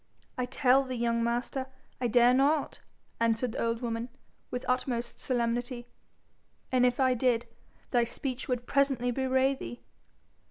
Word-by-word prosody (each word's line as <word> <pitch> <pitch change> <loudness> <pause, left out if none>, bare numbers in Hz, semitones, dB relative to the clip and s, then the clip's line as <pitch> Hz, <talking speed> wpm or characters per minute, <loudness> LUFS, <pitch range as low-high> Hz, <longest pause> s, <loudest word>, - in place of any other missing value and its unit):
'I 250 - +1
tell 265 +1 +4
thee, 255 -1 -5
young 235 -1 +1
master, 240 +3 -1 0.3
I 245 - +2
dare 240 +2 +5
not,' 285 +3 +2 0.4
answered 230 +1 +1
the - - -4
old 230 +1 -1
woman, 230 +1 -2 0.4
with 250 0 -4
utmost 245 -1 -1
solemnity. 240 0 -1 0.9
'And 250 -1 +4
if 245 +1 -1
I 260 -1 +4
did, 245 -1 +1 0.5
thy 240 -1 +3
speech 255 +2 -5
would 245 -1 -2
presently 270 -3 +2
bewray 265 +1 +2
thee.' 120 - -8
245 Hz, 145 wpm, -29 LUFS, 235-260 Hz, 0.9 s, dare